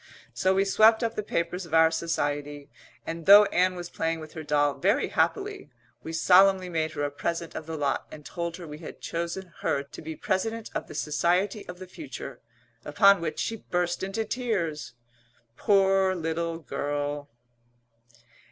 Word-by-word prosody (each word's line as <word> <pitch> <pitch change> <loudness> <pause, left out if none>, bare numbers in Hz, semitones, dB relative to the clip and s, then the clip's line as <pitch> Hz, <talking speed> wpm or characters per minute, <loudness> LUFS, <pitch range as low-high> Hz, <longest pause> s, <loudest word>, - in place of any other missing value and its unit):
So 190 0 +1
we 195 +1 +3
swept 220 +4 +5
up 230 - 0
the - - -2
papers 180 -2 -3
of 165 - -2
our 160 0 +6
Society, 145 -3 -3 0.3
and, 165 0 -6
though 205 +1 +10
Ann 185 -2 +1
was 175 -1 -7
playing 165 0 -2
with 155 -1 -10
her 160 - -6
doll 145 -1 +1
very 205 +9 +2
happily, 405 -1 -1 0.3
we 160 - -7
solemnly 185 +2 +5
made 160 -2 -1
her 145 - -3
a 145 - -1
present 165 +3 -3
of 160 - -7
the 160 -1 -4
lot 140 -2 -1
and 150 -1 -11
told 170 -1 -4
her 175 - -9
we 150 -1 -9
had 160 - -9
chosen 170 +1 -4
her 140 - 0
to 140 - -12
be 160 0 -6
President 225 +7 -2
of - - -4
the - - -10
Society 180 +7 0
of 180 - -8
the 185 - -9
future 290 - -9 0.4
upon 200 -3 +5
which 155 -2 -3
she 225 - -2
burst 175 -3 -2
into 195 +4 -2
tears, 175 - -2 0.6
poor 195 +1 +3
little 165 0 -2
girl. 145 -2 -3
170 Hz, 170 wpm, -27 LUFS, 155-195 Hz, 0.6 s, though